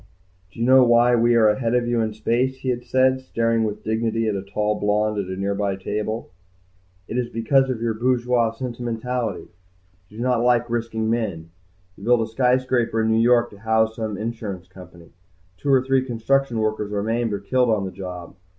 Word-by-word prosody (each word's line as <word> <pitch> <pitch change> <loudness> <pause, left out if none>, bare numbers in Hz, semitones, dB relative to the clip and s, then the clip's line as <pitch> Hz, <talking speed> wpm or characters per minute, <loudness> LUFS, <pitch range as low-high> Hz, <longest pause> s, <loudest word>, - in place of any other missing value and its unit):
"Do - - -14
you 115 - +1
know 130 +1 +7
why 120 0 +4
we 120 0 +3
are 110 -2 +5
ahead 115 +2 +1
of 120 -1 +1
you 120 -1 +1
in 110 -1 -1
space?" 120 +4 0
he 130 - -2
had 120 -1 -2
said, 130 +1 +2
staring 115 -3 0
with 105 0 -4
dignity 115 0 -1
at 110 - 0
the 100 - -3
tall 105 +2 -1
blonde 105 +1 0
at 100 - -3
a 95 0 -5
nearby 100 0 -1
table. 105 +3 -4 0.8
"It 120 - -2
is 120 -1 -2
because 130 +4 +2
of 120 -3 -3
your 115 -1 0
bourgeois 120 0 +1
sentimentality. 120 -2 -4 0.6
You 105 - -14
do 120 - -3
not 125 -2 +1
like 120 -1 +2
risking 115 -1 -2
men. 100 -8 -2 0.4
You 100 - -14
build 120 +1 +3
a - - 0
skyscraper 125 -1 +1
in 110 - +1
New 110 0 +3
York 120 0 +3
to 100 - -14
house 110 0 +1
some 110 -3 -3
insurance 105 -5 -5
company. 90 -2 -15 0.5
Two 140 - -4
or 130 -1 +4
three 135 -1 +2
construction 130 +1 0
workers 110 -1 -1
are 100 -1 -1
maimed 115 +1 -1
or 100 - -2
killed 125 +4 +1
on 105 -3 +1
the 95 - -5
job. 90 -3 -8
115 Hz, 200 wpm, -22 LUFS, 105-120 Hz, 0.8 s, know